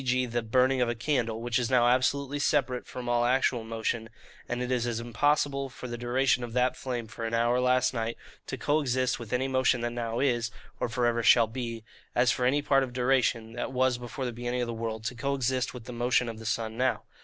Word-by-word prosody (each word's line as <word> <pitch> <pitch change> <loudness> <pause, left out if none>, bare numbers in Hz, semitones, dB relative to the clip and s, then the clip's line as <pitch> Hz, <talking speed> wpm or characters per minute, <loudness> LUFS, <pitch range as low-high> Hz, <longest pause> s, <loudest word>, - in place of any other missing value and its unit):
g. 125 0 +1
the 120 0 -2
burning 130 +3 +2
of 120 - +2
a 120 - -1
candle, 115 -2 -1
which 120 0 +1
is 120 -1 -1
now 125 -2 +4
absolutely 140 +3 +1
separate 130 -4 +1
from 125 -1 -7
all 120 0 +2
actual 125 -1 +2
motion; 115 0 -3 0.4
and 120 - -2
it 125 0 -2
is 120 -1 +1
as 115 -1 -2
impossible 140 +3 +1
for 125 - -8
the 120 - -4
duration 125 +1 +1
of 120 -1 -6
that 125 +1 +2
flame 125 -3 -4
for 110 +1 -8
an 115 0 -1
hour 120 +2 +2
last 125 0 +3
night 115 -1 -2 0.3
to - - -4
co 150 +2 +1
exist 130 -3 0
with 115 -2 -9
any 125 +1 +1
motion 130 -2 +2
that 120 0 -1
now 115 -1 -3
is, 120 -5 +1 0.3
or - - -1
for 120 +1 0
ever 120 0 +2
shall 115 0 +6
be, 115 -1 -5 0.3
as 125 0 +4
for 125 - 0
any 145 +3 +2
part 135 -1 +4
of 130 -2 -3
duration, 125 -3 +1
that 120 +2 -4
was 130 -1 +1
before 125 +2 -5
the 120 - -3
beginning 120 +1 -2
of 120 - -1
the 115 - -3
world, 110 -1 -4
to 115 - -2
co 140 +4 -1
exist 130 -1 0
with 125 -3 -9
the 125 - -7
motion 120 +1 +1
of 115 -1 -6
the 110 - -7
sun 110 0 -2
now. 130 +2 0
125 Hz, 240 wpm, -28 LUFS, 115-130 Hz, 0.4 s, shall